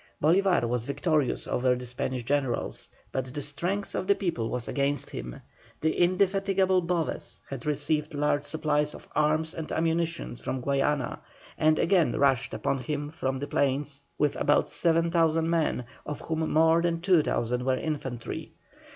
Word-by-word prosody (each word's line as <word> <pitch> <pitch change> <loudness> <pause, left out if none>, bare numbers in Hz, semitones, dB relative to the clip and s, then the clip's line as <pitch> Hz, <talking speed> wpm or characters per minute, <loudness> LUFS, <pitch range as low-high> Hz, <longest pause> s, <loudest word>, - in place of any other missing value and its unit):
Bolívar 180 -3 +3
was 120 -1 -1
victorious 145 +1 0
over 125 0 +2
the 125 0 -6
Spanish 125 +1 -3
generals, 135 0 -1 0.2
but 130 -1 -3
the 145 +2 -4
strength 175 +8 -3
of 185 - -2
the 200 - +5
people 175 - -2
was 125 -2 -3
against 140 -1 -1
him. - - -6 0.4
The 160 - +2
indefatigable 190 +1 +2
Boves 170 -1 -2
had 135 0 -6
received 150 +1 -1
large 145 0 +1
supplies 150 0 0
of - - -12
arms 155 +2 +1
and 160 -2 -6
ammunition 165 -2 -1
from 130 - -3
Guayana, 140 0 0 0.4
and 155 0 +3
again 175 -2 +3
rushed 135 -2 +2
upon 135 - -1
him 145 +3 -3
from 135 -4 -2
the 140 - -3
plains 140 0 0 0.2
with 150 -1 +1
about 145 - +3
7,000 165 -1 +2
men, 165 -7 +1 0.2
of 150 - -5
whom 160 0 -2
more 160 +1 +5
than 170 -1 0
2,000 145 -9 +2
were 130 0 +1
infantry. 135 -7 -4
150 Hz, 150 wpm, -28 LUFS, 135-165 Hz, 0.4 s, the